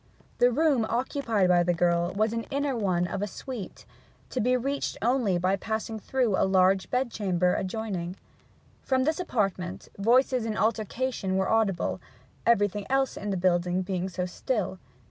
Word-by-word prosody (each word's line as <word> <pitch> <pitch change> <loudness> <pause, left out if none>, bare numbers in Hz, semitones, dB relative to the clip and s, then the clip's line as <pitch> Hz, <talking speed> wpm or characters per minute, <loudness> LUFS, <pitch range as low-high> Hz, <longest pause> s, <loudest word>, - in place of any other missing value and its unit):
The 245 - +6
room 285 -3 +3
occupied 230 -5 0
by 175 -1 +5
the 175 0 +1
girl 175 +1 +2
was 215 +2 +1
an 230 0 -3
inner 280 -1 -1
one 185 -6 +1
of 195 +2 -4
a 205 - -1
suite, 225 0 -8 0.5
to 255 - -1
be 250 +3 +3
reached 275 +3 -2
only 230 -5 +2
by 185 +2 +1
passing 220 +2 -4
through 245 -2 0
a - - +2
large 190 0 +3
bedchamber 200 -8 +1
adjoining. 190 -3 -3 0.7
From 260 -1 +1
this 310 +4 0
apartment 195 - -2
voices 250 +3 +3
in 220 -1 -3
altercation 220 -2 -1
were 190 - +1
audible, 220 -5 +1 0.5
everything 205 -3 +2
else 270 0 +1
in 205 - -5
the 195 - 0
building 180 0 +1
being 185 0 -2
so 180 0 -3
still. 190 0 -2
210 Hz, 160 wpm, -27 LUFS, 185-245 Hz, 0.7 s, The